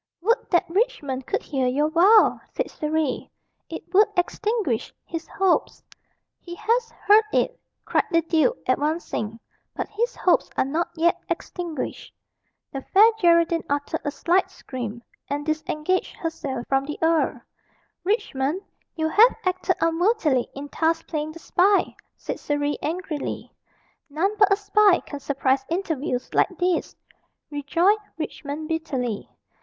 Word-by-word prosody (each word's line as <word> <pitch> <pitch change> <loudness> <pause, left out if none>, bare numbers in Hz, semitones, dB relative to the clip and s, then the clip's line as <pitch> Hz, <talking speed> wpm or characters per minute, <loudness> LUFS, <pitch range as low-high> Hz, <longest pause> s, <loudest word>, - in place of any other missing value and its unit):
"Would 465 +4 +1
that 345 - +2
Richmond 330 - -1
could - - -1
hear 265 -3 -1
your 295 +5 +1
vow!" 395 +7 +5
said - - -2
Surrey; 305 -3 -2 0.4
"it - - -6
would 410 +3 +6
extinguish 395 - 0
his 330 -1 -6
hopes." 385 -2 0 0.6
"He 345 -1 -9
has 460 +4 0
heard 425 0 +4
it!" - - 0 0.3
cried - - +1
the 335 -2 +2
duke, 330 +9 +2
advancing. 290 -8 -1 0.4
"But - - -3
his 470 +4 -2
hopes 360 - +2
are - - +3
not 320 +5 -1
yet 340 +1 +2
extinguished." 340 -6 -5 0.6
The 270 - -5
Fair 425 +10 +5
Geraldine 335 -2 +4
uttered 285 0 -1
a - - -1
slight 355 +5 +1
scream, 240 -3 -7 0.3
and 290 +1 -2
disengaged 310 +3 -1
herself 280 -7 -4
from 270 0 +1
the 300 +1 -5
earl. 325 -1 +2 0.6
"Richmond, 350 - -1 0.3
you 315 -1 0
have 440 +9 +6
acted 370 0 +1
unworthily 330 - +2
in 280 +1 -6
thus 325 0 +2
playing 310 -1 -4
the - - -10
spy," 380 +4 +2 0.2
said - - -5
Surrey 290 0 -1
angrily. 320 -2 -4 0.6
"None 360 +8 0
but 410 -2 +5
a - - +6
spy 405 -1 +4
can 285 - -8
surprise 275 -1 0
interviews 315 -8 -2
like - - +3
these," 355 -1 0 0.6
rejoined 335 +9 +2 0.2
Richmond 305 -1 -5
bitterly. 265 -9 -3
330 Hz, 135 wpm, -24 LUFS, 290-380 Hz, 0.6 s, would